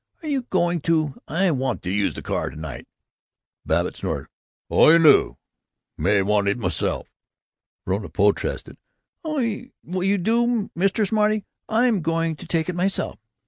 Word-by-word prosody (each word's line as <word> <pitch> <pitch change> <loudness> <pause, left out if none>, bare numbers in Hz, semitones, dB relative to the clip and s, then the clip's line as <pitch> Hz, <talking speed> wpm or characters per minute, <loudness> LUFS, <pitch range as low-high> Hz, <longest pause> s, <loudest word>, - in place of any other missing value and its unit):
Are - - -6
you 280 -3 0
going 175 -2 +1
to 155 -3 0
I 180 +4 +1
want 135 -2 -2
to 90 - -3
use 100 +1 0
the - - -7
car - - -2
to - - -12
night." 80 -3 -7 0.8
Babbitt - - 0
snorted, - - -4 0.4
"Oh, - - +5
you 165 - +8
do! 155 -4 +5 0.6
May 100 +1 +2
want 100 0 +1
it 100 - +1
myself!" 90 -8 -2 0.8
Verona 100 +3 -2
protested, 100 0 0 0.5
"Oh, 310 -2 -3
you 205 - -2
do, 230 +3 +1
Mr. 195 +4 +1
Smarty! 215 -1 +1 0.2
I'm 225 -3 +2
going 165 0 0
to - - -11
take 160 -2 0
it 180 - -2
myself!" 190 +2 -1
170 Hz, 150 wpm, -23 LUFS, -, 0.8 s, you